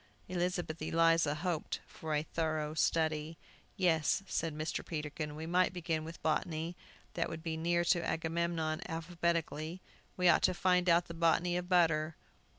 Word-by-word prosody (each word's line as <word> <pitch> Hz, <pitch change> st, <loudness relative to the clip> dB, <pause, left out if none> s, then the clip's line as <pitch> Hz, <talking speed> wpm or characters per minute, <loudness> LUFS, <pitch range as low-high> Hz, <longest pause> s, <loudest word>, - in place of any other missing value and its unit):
Elizabeth 175 Hz, -3 st, -2 dB
Eliza 165 Hz, -1 st, +3 dB
hoped 170 Hz, 0 st, -2 dB
for 155 Hz, -1 st, -4 dB
a 150 Hz, -, +1 dB
thorough 155 Hz, -2 st, -2 dB
study. 160 Hz, 0 st, 0 dB, 0.4 s
"Yes," 175 Hz, -1 st, +2 dB
said 165 Hz, -4 st, -2 dB
Mr. 155 Hz, +1 st, -2 dB
Peterkin, 150 Hz, -1 st, -4 dB
"we 160 Hz, +1 st, -5 dB
might 180 Hz, +2 st, +2 dB
begin 165 Hz, -3 st, -2 dB
with 165 Hz, +1 st, -9 dB
botany. 160 Hz, +2 st, -1 dB, 0.4 s
That 170 Hz, -, -1 dB
would 160 Hz, -1 st, -6 dB
be 165 Hz, -2 st, -2 dB
near 170 Hz, +2 st, +1 dB
to 170 Hz, 0 st, +3 dB
Agamemnon 165 Hz, -1 st, -1 dB
alphabetically. 165 Hz, -1 st, -2 dB, 0.4 s
We 180 Hz, -1 st, +3 dB
ought 170 Hz, -, +6 dB
to 185 Hz, -, +3 dB
find 180 Hz, 0 st, +3 dB
out 170 Hz, +1 st, +5 dB
the 170 Hz, -, -8 dB
botany 170 Hz, +1 st, +2 dB
of 180 Hz, 0 st, -3 dB
butter. 160 Hz, -3 st, +3 dB
165 Hz, 155 wpm, -33 LUFS, 155-175 Hz, 0.4 s, ought